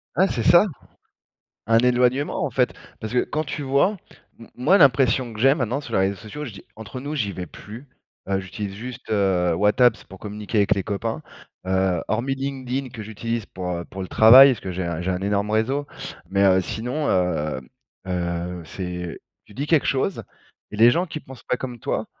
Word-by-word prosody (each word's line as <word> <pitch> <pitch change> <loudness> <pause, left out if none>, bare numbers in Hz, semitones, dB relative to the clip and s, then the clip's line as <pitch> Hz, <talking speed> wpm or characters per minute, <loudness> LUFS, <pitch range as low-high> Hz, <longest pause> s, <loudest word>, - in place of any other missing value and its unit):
Ouais 190 +2 +4
c'est 120 - -2
ça, 175 - +6 1.0
un 115 0 +4
éloignement 125 +4 +2
en 140 - -1
fait, 125 0 +1 0.3
parce 110 - -5
que, 125 - +3
quand 155 +1 -2
tu 145 +1 -5
vois 140 +10 +2 0.4
m 115 - -13
moi 155 +11 +4
l'impression 130 - +4
que 110 - -8
j'ai 135 +2 +5
maintenant 130 0 -1
sur 130 -6 -7
les 95 - +3
réseaux 95 +1 +1
sociaux, 145 +9 -8
je 120 - -7
dis 100 - -12
entre 110 +4 -8
nous, 145 +3 -5
j'y 105 -8 -1
vais 90 -1 -6
plus, 120 +7 -11 0.4
heu, 95 0 0
j'utilise 95 +1 -6
juste, 125 +3 -8
heu, 95 -5 +2
WhatApps 110 +5 +3
pour 95 - -13
communiquer 105 +1 -4
avec 100 - +3
les 100 - -2
copains. 110 +3 -3 0.4
Heu, 95 -2 +1
hormis 125 +5 0
LinkedIn 135 -1 -4
que 110 - -8
j'utilise 110 +1 -4
pour, 90 -1 -5
heu, 85 -1 -3
pour 95 0 -7
le 95 - -6
travail 130 +5 +9
parce 120 - -5
que 95 - -5
j'ai 90 0 -3
un 85 -1 -3
j'ai 95 +2 -2
un 90 +1 -2
énorme 100 +1 0
réseau. 130 +7 0 0.4
Mais, 100 0 +1
heu, 95 -1 +5
sinon, 125 - -3
hem, 75 -7 0 0.4
heu, 85 -1 -3
c'est, 90 -2 -6 0.3
tu 105 - -17
dis 140 +4 -3
quelque 160 -3 +3
chose 140 +8 0 0.5
et - - -5
les 115 +2 +7
gens 175 +7 +1
qui 155 -2 -6
pensent 130 -3 -13
pas 125 - 0
comme 125 -2 -6
toi - - -2
110 Hz, 205 wpm, -23 LUFS, 95-130 Hz, 1.0 s, travail